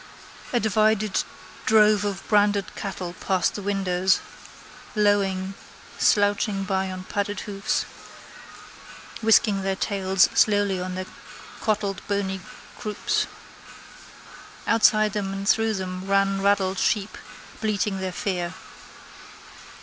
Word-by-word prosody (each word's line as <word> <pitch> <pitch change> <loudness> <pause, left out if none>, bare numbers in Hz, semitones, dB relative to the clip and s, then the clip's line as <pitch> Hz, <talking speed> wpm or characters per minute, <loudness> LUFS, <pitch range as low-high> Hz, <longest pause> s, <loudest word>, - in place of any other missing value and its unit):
A 240 - +2
divided 215 -1 +2 0.4
drove 215 -1 +5
of 200 -2 -4
branded 205 -2 +2
cattle 185 -3 -5
passed 185 -2 +1
the 205 - -5
windows, 190 -2 +1 0.8
lowing, 195 -2 +1 0.5
slouching 205 -1 +2
by 190 -1 -1
on 185 0 -6
padded 205 +1 -3
hoofs, 195 -1 -1 1.4
whisking 215 -2 +4
their 190 0 -1
tails 190 -2 +2
slowly 205 -3 +3
on 180 0 -4
their 185 0 -4 0.5
clotted 205 -3 -1
bony 195 -2 -1 0.4
croups. 210 -1 -1 1.4
Outside 215 -2 +4
them 195 -2 -2
and 195 0 -5
through 225 0 +3
them 185 0 -5
ran 195 0 +2
raddled 195 -1 +2
sheep 210 -2 0 0.5
bleating 210 -2 0
their 190 -1 -3
fear. 180 -1 -3
195 Hz, 105 wpm, -24 LUFS, 190-210 Hz, 1.4 s, drove